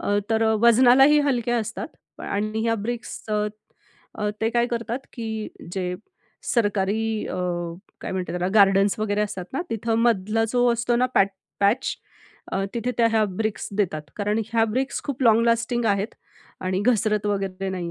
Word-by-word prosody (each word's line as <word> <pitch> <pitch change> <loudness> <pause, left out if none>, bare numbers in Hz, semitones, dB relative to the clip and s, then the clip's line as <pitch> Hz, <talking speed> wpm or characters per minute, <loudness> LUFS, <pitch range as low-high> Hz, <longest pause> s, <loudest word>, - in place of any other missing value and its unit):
अ, 205 - 0
तर 225 0 +2 0.2
वजनालाही 255 +5 +6
हलक्या 240 -3 +1
असतात 220 0 -4 0.3
आणि 215 +2 -2
ह्या 230 0 +2
ब्रिक्सच 215 -3 -3 0.7
अ, 210 -1 0
ते 220 - +2
काय 235 +1 +2
करतात 235 +1 -3
की 220 -3 -4 0.2
जे 180 -1 -2 0.5
सरकारी 215 0 0
अ, - - -4 0.7
काय - - -5
म्हणतात 185 -1 -3
त्याला 180 +1 -1
गार्डन्स 195 0 +5
वगेरे 210 -1 0
असतात 190 -3 -2
ना, 275 - -1
तिथं 225 0 -1
मधला 225 -1 +2
जो 245 0 +3
असतो 235 +1 0
ना 250 +1 +3
पॅट 195 - +5 0.3
पॅच 205 +6 +2 0.6
अ, 195 - 0
तिथे 235 +1 -1
त्या 230 - +5
ह्या 220 -1 +3
ब्रिक्स 215 +3 -3
देतात. 170 -7 0
कारण 210 +1 0
ह्या 225 -1 +4
ब्रिक्स 255 +5 -2
खूप 275 -2 -3
लाँग 225 -2 +5
लास्टिंग 235 +1 +1
आहेत 200 +1 0 0.5
आणि 185 +1 -1
घसरत 215 -3 +2
वगेरे 195 -1 -2
नाही 180 -2 -4
220 Hz, 160 wpm, -24 LUFS, 200-235 Hz, 0.7 s, वजनालाही